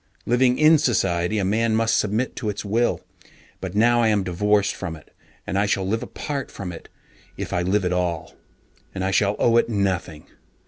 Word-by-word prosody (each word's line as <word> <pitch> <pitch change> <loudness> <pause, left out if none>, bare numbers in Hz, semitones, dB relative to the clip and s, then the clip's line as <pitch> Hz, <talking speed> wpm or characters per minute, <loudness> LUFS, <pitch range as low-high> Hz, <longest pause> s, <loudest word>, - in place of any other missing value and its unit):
Living 125 +1 +3
in 155 0 +6
society, 105 - +1
a 100 - 0
man 110 +3 +1
must 115 0 +2
submit 110 +5 0
to 110 -4 -3
its 105 +1 -5
will, 115 +4 0 0.6
but 95 0 -6
now 120 +2 +4
I 115 - +3
am 105 -3 +2
divorced 100 +3 +1
from 90 -4 -6
it, 80 - -18 0.3
and 95 - -1
I 100 - +2
shall 95 -2 0
live 110 +3 -1
apart 140 -3 -5
from 95 -3 -7
it 85 - -11 0.5
if - - -5
I 90 - +1
live 95 +2 +1
at 90 - 0
all, 85 -3 -2 0.6
and 95 -1 -2
I 95 - 0
shall 100 +1 +2
owe 115 0 +3
it 120 - +2
nothing. 95 -7 -2
105 Hz, 195 wpm, -23 LUFS, 95-115 Hz, 0.6 s, in